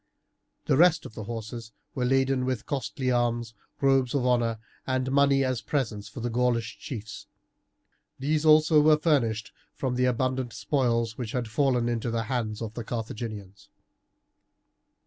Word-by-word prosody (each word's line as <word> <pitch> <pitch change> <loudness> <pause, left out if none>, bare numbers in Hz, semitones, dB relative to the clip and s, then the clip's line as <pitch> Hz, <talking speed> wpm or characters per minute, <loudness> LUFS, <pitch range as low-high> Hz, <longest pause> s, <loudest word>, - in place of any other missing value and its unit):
The - - +2
rest 165 0 +5
of - - -9
the 110 - -7
horses 115 0 -6 0.2
were 125 - -1
laden 135 0 +2
with 125 -4 -2
costly 130 -1 -2
arms, 120 -2 0 0.3
robes 135 -2 +3
of 130 -3 +1
honour, 120 -2 +2 0.3
and 130 0 0
money 140 0 +4
as 130 -2 -1
presents 110 -8 -2
for 110 - -8
the 120 - -1
Gaulish 120 -1 0
chiefs. 110 -4 -7 0.9
These 150 +3 0
also 155 0 +6
were 155 0 +5
furnished 120 -9 +1 0.2
from 130 -2 -2
the 125 0 +1
abundant 130 0 0
spoils 115 -5 0
which 115 -3 -4
had 125 -2 -1
fallen 125 +1 +1
into 120 0 -1
the 115 0 -1
hands 110 -2 -3
of 110 -1 -6
the 120 - -5
Carthaginians. 110 -3 -6
125 Hz, 150 wpm, -27 LUFS, 115-135 Hz, 0.9 s, also